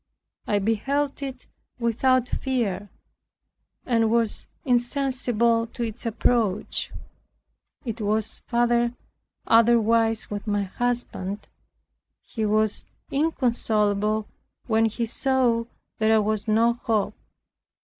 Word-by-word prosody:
I 205 - +2
beheld 270 +8 0
it 265 -2 -6 0.3
without 245 +2 +2
fear, 210 -9 -2 1.0
and 230 -3 +2
was 230 -1 0 0.2
insensible 245 -3 +1
to 235 +1 -5
its 230 +1 -4
approach. 220 -2 0 0.9
It 230 -1 -4
was 215 +1 -1
far 240 0 +2 0.5
otherwise 225 -1 +3
with 205 +1 -5
my 205 -1 +1
husband. 205 -2 -3 0.8
He 220 -2 -3
was 215 0 +1 0.3
inconsolable 220 -7 +1 0.4
when 225 -1 +3
he 230 +2 -1
saw 245 -1 +1 0.3
there 220 0 +4
was 215 +1 -1
no 225 +2 +4
hope. 220 -3 -1
230 Hz, 95 wpm, -25 LUFS, 215-245 Hz, 1.0 s, there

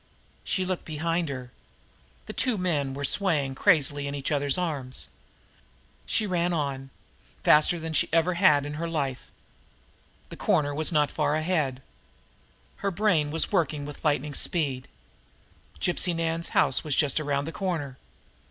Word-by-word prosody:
She 185 - -1
looked 185 -1 -2
behind 165 +1 -1
her. 130 -2 -6 0.7
The - - -7
two 250 -4 +1
men 145 -7 -1
were 140 +1 -2
swaying 155 -5 +2
around - - -8
crazily 145 -6 +3
in 140 - -4
each 140 +1 -3
other's 145 0 +1
arms. 145 -8 -3 1.0
She 220 - +1
ran 175 -2 0
on 140 -4 -2 0.5
faster 155 +3 +5
than 160 0 -5
she 145 - +3
had - - -2
ever 165 +2 +3
run 145 -7 +5
in 145 - -5
her 170 - -2
life. 140 -6 -3 1.0
The - - -9
corner 145 -1 +1
was 155 +4 +1
not 150 -3 +2
far 150 -1 0
ahead. 155 -5 -1 0.9
Her 200 - -1
brain 180 -6 +2
was 160 +2 0
working 155 -6 0
with 145 0 -9
lightning 150 -1 0
speed. 135 -4 -2 0.9
Gypsy 175 0 +1
Nan's 165 0 -2
house 130 - +3
was 150 -4 -1
just 145 0 +2
around 145 -2 -1
the 165 - -5
corner. 160 -9 -3
150 Hz, 155 wpm, -27 LUFS, 140-170 Hz, 1.0 s, faster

